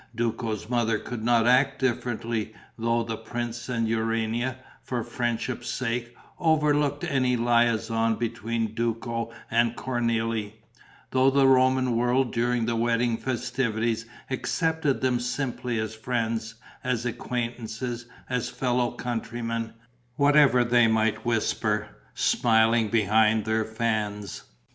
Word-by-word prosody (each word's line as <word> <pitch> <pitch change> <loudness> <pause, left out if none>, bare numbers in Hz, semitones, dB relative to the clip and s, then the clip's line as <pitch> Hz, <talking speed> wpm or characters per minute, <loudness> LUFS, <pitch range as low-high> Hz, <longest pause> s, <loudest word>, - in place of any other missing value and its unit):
Duco's 115 -2 -2
mother 115 -2 +1
could 115 0 -6
not 120 -1 +3
act 135 +3 +4
differently, 115 -3 -2 0.2
though 115 0 0
the 115 -1 -3
prince 120 +2 -5
and 115 -2 0
Urania, 115 +2 -1 0.2
for 120 -3 -3
friendship's 120 0 -3
sake, 120 -1 -3 0.2
overlooked 150 -3 +2
any 130 -2 +1
liaison 115 -1 +2
between 115 -1 -2
Duco 115 0 -2 0.2
and 115 0 +2
Cornélie; 115 -4 -1 0.6
though 130 +1 +4
the 135 0 +4
Roman 130 -1 +4
world 125 +2 +1
during 120 0 +1
the 115 0 0
wedding 115 0 +1
festivities 115 -2 -1 0.2
accepted 160 +1 0
them 130 -2 +2
simply 125 -1 -2
as 110 0 -2
friends, 115 -1 -2 0.3
as 125 -2 -1
acquaintances, 120 0 -4 0.2
as 125 -2 -1
fellow 125 -1 0
countrymen, 115 -1 -3 0.4
whatever 140 -3 +5
they 120 -1 +4
might 110 0 +1
whisper, 105 -2 0 0.3
smiling, 115 -1 +3
behind 110 0 +3
their 110 0 +1
fans. 110 -3 -2
120 Hz, 115 wpm, -26 LUFS, 115-125 Hz, 0.6 s, whatever